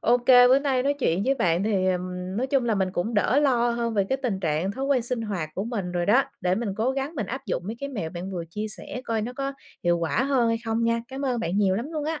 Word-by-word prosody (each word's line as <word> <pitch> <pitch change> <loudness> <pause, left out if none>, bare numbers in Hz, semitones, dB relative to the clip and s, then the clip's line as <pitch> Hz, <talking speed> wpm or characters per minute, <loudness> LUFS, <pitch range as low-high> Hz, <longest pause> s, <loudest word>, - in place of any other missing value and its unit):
OK, 245 +1 +2 0.2
bữa 265 +2 +6
nay 270 -3 +1
nói 285 +1 +1
chuyện 185 -7 +1
với 270 +1 +3
bạn 180 -5 +1
thì, 195 -4 +1
ờm, 180 +1 -3
nói 255 +3 0
chung 270 -2 +1
là 225 -2 +1
mình 190 -2 0
cũng 215 +6 -2
đỡ 230 +6 +3
lo 240 -4 +3
hơn 235 -1 -1
về 200 -2 +2
cái 265 - 0
tình 205 -7 -1
trạng 165 +3 0
thói 265 +5 -4
quen 275 -4 +2
sinh 240 -1 -2
hoạt 190 -8 -3
của 195 - -2
mình 200 -7 -3
rồi 175 -1 -1
đó, 245 +7 +5 0.2
để 180 0 +1
mình 225 +1 -2
cố 230 +4 +1
gắng 275 +4 -3
mình 215 -8 -3
áp 265 +3 -6
dụng - - -2
mấy 225 +2 -4
cái 280 - -3
mẹo 200 -12 -4
bạn 180 +2 -6
vừa 175 -3 -4
chia 210 +5 -3
sẻ 235 +3 -6
coi 225 -1 -1
nó 245 +3 -4
có 275 +1 -3 0.3
hiệu 175 0 +3
quả 170 +8 0
hơn 260 -4 +2
hay 230 - +2
không 225 +1 0
nha. 230 0 +1
Cám 270 +1 -5
ơn 245 -3 0
bạn 175 +4 -1
nhiều 190 -2 +3
lắm 260 +8 -4
luôn 300 -2 -2
á. 315 0 -2
230 Hz, 290 wpm, -25 LUFS, 185-260 Hz, 0.3 s, bữa